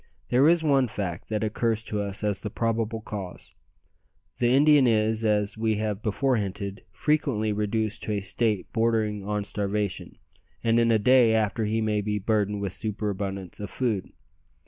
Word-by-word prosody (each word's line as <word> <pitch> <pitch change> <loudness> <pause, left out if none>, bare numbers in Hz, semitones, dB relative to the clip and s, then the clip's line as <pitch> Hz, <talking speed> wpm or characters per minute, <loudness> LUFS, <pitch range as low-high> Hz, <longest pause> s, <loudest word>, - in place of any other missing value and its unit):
There 130 +5 +5
is 170 -1 +3
one 135 -4 +3
fact 95 -6 -5
that 110 -1 -1
occurs 110 +1 0
to 105 -2 -3
us 100 +1 -2
as 100 -2 0
the 105 - -4
probable 115 0 -1
cause. 100 -4 -7 0.9
The 120 - +3
Indian 140 +1 +5
is, 110 0 +2
as 105 0 0
we 110 -1 +1
have 105 -1 -2
before 125 +4 +1
hinted, 100 -1 -4
frequently 130 - 0
reduced 105 +1 -1
to 105 - -1
a 105 - 0
state 100 +2 -1
bordering 110 -3 +1
on 105 +1 -2
starvation, 100 -1 -3 0.5
and 115 0 +3
in 115 0 +3
a 115 - +5
day 115 +1 +5
after 110 0 0
he 110 +1 0
may 105 -1 0
be 105 0 -1
burdened 105 0 0
with 100 -3 -2
superabundance 100 -4 -4
of 105 - -5
food. 110 -7 -2
110 Hz, 170 wpm, -26 LUFS, 105-115 Hz, 0.9 s, There